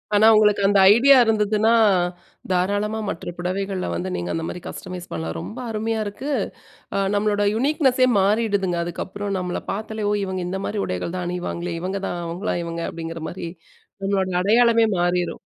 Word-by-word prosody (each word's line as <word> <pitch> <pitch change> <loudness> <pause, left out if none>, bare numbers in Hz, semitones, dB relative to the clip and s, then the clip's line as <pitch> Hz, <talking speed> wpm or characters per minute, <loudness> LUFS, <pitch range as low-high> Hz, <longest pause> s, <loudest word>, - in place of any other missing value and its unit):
ஆனா 215 +2 +6
உங்களுக்கு 210 -1 +4
அந்த 200 0 +4
ஐடியா 270 +5 +6
இருந்ததுன்னா, 220 0 +2 0.8
தாராளமா 205 +4 0
மற்ற 170 - -5
புடவைகள்ல 190 - -2
வந்து 90 +2 -3
நீங்க 85 0 -3
அந்த 165 - -2
மாரி 175 - -6
கஸ்டமைஸ் 180 -1 -7
பண்ணலாம். 80 0 -4
ரொம்ப 240 - -7
அருமையா 220 +1 -2
இருக்கு, 250 +8 -5 0.6
அ - - +1 0.2
நம்மளோட 205 0 +1
யுனிக்னெஸ்ஸே 260 0 +3
மாறிடுதுங்க, 200 -3 +1
அதுக்கப்புறம் 195 +4 -4
நம்மள 180 -1 -3
பார்த்தாலே, 215 +1 -4
ஓ! - - +2
இவங்க 190 -1 -3
இந்த 190 +1 -3
மாரி 210 - -3
உடைகள் 90 - -3
தான் 180 - -3
அணிவாங்களே 175 -1 -4
இவங்க 190 +2 -3
தான். 175 - -4
அவங்களா 175 +5 -3
இவங்க 170 0 -4
அப்படிங்கிற 165 0 -6
மாரி 175 -1 -6 0.6
நம்மளோட 195 -1 +1
அடையாளமே 230 +3 +4
மாறிரும். 175 0 0
195 Hz, 155 wpm, -22 LUFS, 175-215 Hz, 0.8 s, ஆனா